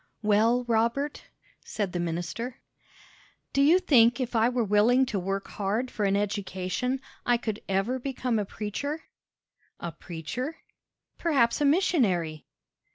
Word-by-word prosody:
"Well, 220 Hz, +4 st, +3 dB
Robert?" 235 Hz, +5 st, 0 dB, 0.4 s
said 205 Hz, -4 st, -3 dB
the 175 Hz, -, -1 dB
minister. 175 Hz, +9 st, -3 dB, 1.0 s
"Do 275 Hz, -, +3 dB
you 310 Hz, +6 st, +6 dB
think 245 Hz, -10 st, +4 dB
if 250 Hz, -2 st, -3 dB
I 225 Hz, +1 st, +4 dB
were 250 Hz, -1 st, 0 dB
willing 220 Hz, +5 st, +4 dB
to 210 Hz, -6 st, -2 dB
work 195 Hz, +2 st, -3 dB
hard 215 Hz, +5 st, -2 dB
for 210 Hz, -, -1 dB
an 195 Hz, 0 st, +2 dB
education, 200 Hz, +5 st, -2 dB, 0.2 s
I 245 Hz, 0 st, +3 dB
could 220 Hz, -2 st, -4 dB
ever 195 Hz, +7 st, 0 dB
become 250 Hz, -3 st, -1 dB
a 205 Hz, -, -1 dB
preacher?" 285 Hz, +11 st, -4 dB, 0.8 s
"A 170 Hz, -, -4 dB
preacher?" 180 Hz, -, -5 dB, 0.6 s
"Perhaps 275 Hz, -7 st, +2 dB
a -, -, +4 dB
missionary." 215 Hz, -, +2 dB
230 Hz, 135 wpm, -27 LUFS, 195-255 Hz, 1.0 s, you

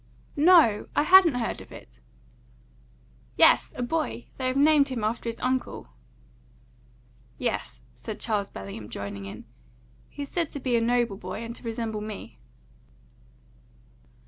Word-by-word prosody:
"No! 300 Hz, -, +5 dB
I -, -, +3 dB
hadn't 355 Hz, -3 st, +7 dB
heard 240 Hz, -2 st, -2 dB
of -, -, -14 dB
it!" -, -, -13 dB, 1.4 s
"Yes; -, -, +5 dB
a 250 Hz, -, -3 dB
boy. 305 Hz, -2 st, -3 dB
They 260 Hz, -, -2 dB
have 255 Hz, +1 st, -1 dB
named 290 Hz, -1 st, +5 dB
him 245 Hz, -4 st, -3 dB
after 230 Hz, +2 st, -1 dB
his 230 Hz, -, -6 dB
uncle." 255 Hz, -, -2 dB, 1.5 s
"Yes," 125 Hz, -1 st, -3 dB
said 125 Hz, -, -8 dB
Charles 210 Hz, -3 st, -1 dB
Bellingham, 100 Hz, +2 st, -8 dB
joining 100 Hz, -1 st, -6 dB
in. 100 Hz, -, -9 dB, 0.6 s
"He 285 Hz, -, -6 dB
is 280 Hz, -, -9 dB
said 335 Hz, -3 st, -1 dB
to 285 Hz, -, -5 dB
be 250 Hz, -2 st, 0 dB
a 230 Hz, -, +3 dB
noble 235 Hz, -3 st, +1 dB
boy, 185 Hz, +4 st, -6 dB
and 230 Hz, 0 st, -7 dB
to -, -, -12 dB
resemble 225 Hz, -2 st, -4 dB
me." 205 Hz, -, -8 dB
235 Hz, 145 wpm, -26 LUFS, 205-275 Hz, 1.5 s, hadn't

